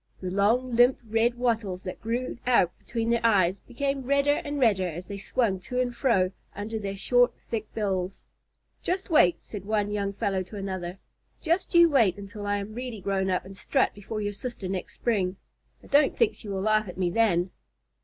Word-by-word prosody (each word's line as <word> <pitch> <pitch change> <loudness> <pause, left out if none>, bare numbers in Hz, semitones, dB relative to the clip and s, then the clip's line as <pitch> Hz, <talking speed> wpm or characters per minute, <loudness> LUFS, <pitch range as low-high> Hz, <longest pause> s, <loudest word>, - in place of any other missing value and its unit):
The 185 -1 -4
long, 230 +6 +2
limp 245 +2 +5
red 225 +2 +2
wattles 225 -7 -1
that 185 - -6
grew 240 +2 -3
out 185 -8 +3
between 230 -1 -2
their 235 0 +1
eyes 195 -4 +3
became 275 +2 -2
redder 280 +2 +2
and 290 -2 -3
redder 205 -7 +3
as 175 +2 -6
they 200 0 -7
swung 200 -2 0
to 250 +7 -4
and 245 -1 0
fro 195 -9 +2 0.2
under 220 +2 -4
their 200 -1 -4
short, 245 +4 +3
thick 220 -2 -5
bills. 190 -3 -2 0.6
"Just 375 +1 -2
wait," 180 - +5
said 205 -4 -7
one 205 0 0
young 200 -1 -1
fellow 195 -2 -1
to 185 +3 -9
another. 190 -2 -4 0.4
"Just 345 +2 0
you 340 0 +8
wait 230 - +3
until 205 +1 -7
I 205 0 +1
am 200 +2 -5
really 245 -2 -5
grown 190 0 0
up 180 -1 0
and 195 +1 -10
strut 265 +6 +1
before 210 +2 -5
your 205 0 -2
sister 215 -3 -5
next 185 -1 -4
spring. 195 -6 0 0.5
I - - -15
don't 290 +1 +3
think 460 -2 +3
she 210 - -10
will 195 -1 -2
laugh 215 +1 +2
at 180 - -9
me 180 -2 0
then." 185 -4 +2
215 Hz, 195 wpm, -27 LUFS, 190-245 Hz, 0.6 s, you